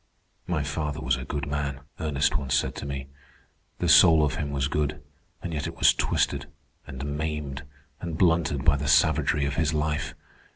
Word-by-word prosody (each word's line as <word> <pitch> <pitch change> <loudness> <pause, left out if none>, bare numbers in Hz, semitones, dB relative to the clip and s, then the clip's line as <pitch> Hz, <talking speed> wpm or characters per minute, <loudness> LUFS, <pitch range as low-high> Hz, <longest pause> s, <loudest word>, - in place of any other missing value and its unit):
"My 85 -4 0
father 75 0 -3
was 65 0 +1
a 65 -1 -6
good 70 0 -3
man," 70 -2 -3 0.2
Ernest 75 -4 0
once 70 -2 0
said - - 0
to - - -5
me. 70 -1 -4 0.7
"The - - -1
soul 80 -2 +7
of 70 - -1
him 75 - -3
was 70 -1 -1
good, 75 0 -1 0.4
and 85 - -4
yet 75 - -2
it - - -7
was - - +6
twisted, - - 0 0.4
and 65 +1 -6
maimed, 75 -2 -3 0.4
and 85 -3 -5
blunted 80 -6 +2
by 75 -3 +5
the 70 +1 -3
savagery 75 0 +3
of 70 0 -3
his 80 -1 +1
life. 75 0 -1
75 Hz, 180 wpm, -26 LUFS, 70-75 Hz, 0.7 s, soul